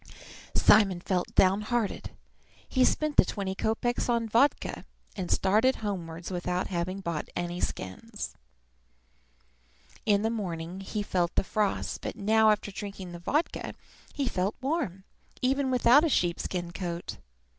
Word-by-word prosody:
Simon 200 -4 +5
felt 180 0 -2
downhearted. 210 +3 +2 0.6
He 260 - +2
spent 305 +3 +1
the - - +9
twenty 195 -2 -3
kopeks 225 +5 -1
on 235 -1 +1
vodka, 235 +7 +2 0.3
and 185 -3 -4
started 215 +7 +3
homewards 175 -5 -5
without 180 0 -2
having 185 +1 -2
bought 170 -4 -3
any 175 0 -3
skins. 210 - -4 1.7
In 205 -1 +3
the 225 - +1
morning 180 -5 -4
he 205 +2 -3
had - - -15
felt 175 -2 0
the - - +3
frost; 210 0 -1
but - - -4
now, 220 +2 +4
after 210 -1 +1
drinking 195 -2 -7
the 175 - -8
vodka, 295 - -1 0.4
he 280 -2 0
felt 190 -1 -1
warm, 255 - -2 0.4
even 270 +1 +2
without 255 +3 +6
a 330 - +2
sheep 175 - +1
skin 175 -2 -3
coat. 175 -1 -5
200 Hz, 140 wpm, -29 LUFS, 180-230 Hz, 1.7 s, the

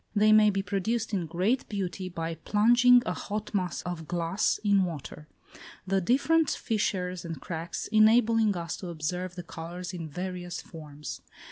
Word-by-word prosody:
They 215 +1 +5
may 215 0 +7
be 195 -1 -1
produced 220 +3 -1
in 180 -4 -1
great 185 - 0
beauty 190 -2 -3
by 165 -1 -4
plunging 240 +8 +5
a 180 - -1
hot 210 +3 -5
mass 185 -4 -1
of 175 -3 -5
glass 175 +3 0
in 200 -2 +4
water; 150 -3 -6 0.6
the 195 0 +1
different 285 - +3
fissures 185 -5 -1
and 165 -4 -6
cracks 165 +2 -5
enabling 220 -1 +4
us 170 -1 -4
to 185 - -7
observe 175 +2 -3
the 175 - -6
colours 175 +3 -7
in 165 -3 -6
various 180 +2 -5
forms. 150 -3 -9
185 Hz, 155 wpm, -28 LUFS, 170-215 Hz, 0.6 s, may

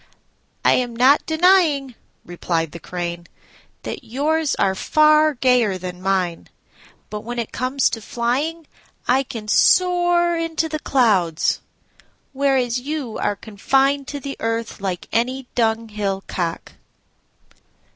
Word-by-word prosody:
"I - - +6
am 245 -2 0
not 260 +5 +4
denying," 315 -5 +3 0.3
replied 170 -2 -2
the 170 - -9
Crane, 175 0 -5 0.6
"that - - -6
yours 295 +5 0
are 190 - +1
far 305 +7 +4
gayer 240 -6 +2
than 180 0 -7
mine; 185 -3 -1 0.6
but 210 - -4
when 240 +2 -6
it 235 -2 -3
comes 255 +2 0
to 225 - -4
flying 275 +10 -2 0.4
I 255 +2 +4
can 225 -5 -7
soar 350 - +3
into 330 -1 -1
the 310 -1 -4
clouds, 200 - +2 0.7
whereas 265 -3 +1
you 275 -3 -4
are 205 - 0
confined 270 +7 0
to 290 - -5
the 275 +1 -6
earth 225 -2 -3
like 185 -3 -4
any 255 +3 -1
dunghill 215 -4 -1
cock." 170 -2 -4
245 Hz, 125 wpm, -21 LUFS, 205-290 Hz, 0.7 s, I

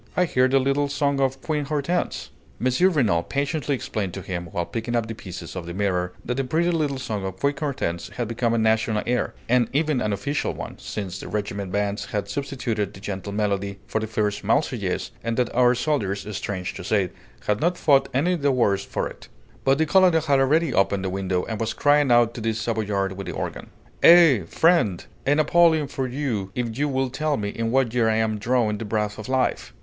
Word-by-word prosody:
I 180 - +4
hear 130 -6 +3
the 135 +1 +3
little 140 +2 +1
song 140 -1 0
of 135 0 0
Queen 150 -2 -1
Hortense!" 155 +4 -2 0.3
M. 130 +9 +3
Renault 115 - +2
patiently 145 0 -1
explained 100 -7 -4
to 95 - -6
him, 85 -1 -4
while 85 +1 -3
picking 115 +4 -3
up 115 -2 +1
the 115 - -4
pieces 90 -5 -8
of 90 -2 -5
the 85 - -6
mirror, 90 -3 0
that 125 +1 -2
the 135 - +1
pretty 165 +7 +1
little 150 -5 0
song 110 -6 -4
of 95 -1 -5
Queen 140 0 +2
Hortense 130 - -3
had 120 -2 -4
become 115 0 0
a - - +1
national 110 -1 +2
air, 125 0 -1
and 120 -1 +3
even 150 -2 +1
an 105 - 0
official 100 +9 -2
one, - - -7
since 95 -3 -5
the - - -8
regimental 100 -1 -3
bands 100 +1 -1
had 105 -4 -3
substituted 115 -4 -3
that - - -11
gentle 100 0 -4
melody 100 -1 -1
for 110 - -1
the 110 - -3
fierce 105 -1 -1
'Marseillaise'; 115 -4 0
and 115 0 -2
that 125 -2 0
our 125 0 +4
soldiers, 110 -8 -1
strange 95 -2 -4
to - - -8
say, 95 -1 +1 0.3
had 105 0 0
not 175 +2 +1
fought 135 -5 +3
any 155 +8 +1
the 145 -4 +1
worse 100 -6 +2
for - - -3
it. - - -12 0.4
But 135 0 +3
the 160 - +2
colonel 185 +3 +5
had 160 - -8
already 150 +2 +2
opened 95 0 +1
the 95 - -1
window, 95 -1 -1
and 110 -1 -4
was 115 0 -2
crying 145 -2 +3
out 120 -1 +4
to 120 - -7
the 110 0 0
Savoyard 110 -3 -1
with 100 +1 -7
the - - -4
organ: - - -5 0.3
"Eh! 165 - +7
Friend! 160 - +2 0.2
A 145 - +4
napoleon 160 0 +4
for 135 -2 -3
you 125 -7 -2
if 120 -2 -2
you 145 +3 0
will 130 -1 -1
tell 155 +1 0
me 100 -1 -2
in 115 +2 -2
what 130 -2 +2
year 120 -2 +3
I 110 - +2
am 110 -1 0
drawing 110 -2 +1
the - - -4
breath 105 0 -2
of 110 - -7
life!" 130 -1 0
115 Hz, 215 wpm, -24 LUFS, 100-140 Hz, 0.4 s, Eh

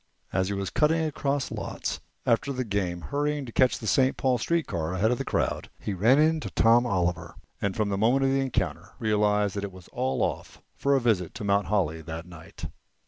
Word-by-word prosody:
As 95 -1 +1
he 100 - -2
was 100 -1 -3
cutting 160 +1 +2
across 140 -2 -1
lots - - -4 0.3
after 120 +4 +2
the 130 -1 -2
game, 95 -5 -2
hurrying 145 - -1
to 120 - -8
catch 130 +2 +3
a - - -4
St. 130 +4 +3
Paul 130 -2 +1
street 170 +7 0
car 85 -3 -3
ahead 110 +5 +2
of 125 - 0
the - - -1
crowd, - - -1
he 105 - -3
ran 110 +8 +4
into 155 +1 +2
Tom 120 +2 +4
Oliver, 90 -4 -1 0.3
and 100 -2 -1
from 105 -2 0
the 100 -1 -1
moment 125 +6 +3
of 135 - +2
the 135 - +2
encounter 135 -2 -2
realized 105 -2 +1
that 100 - -3
it 100 - -4
was 95 -1 -14
all 65 0 -1
off - - -3 0.2
for 140 0 +2
a - - +4
visit 110 -8 0
to - - -6
Mount 100 0 +2
Holly 85 -6 0
that 80 +1 -7
night. 85 -2 -10
105 Hz, 215 wpm, -27 LUFS, 95-135 Hz, 0.3 s, ran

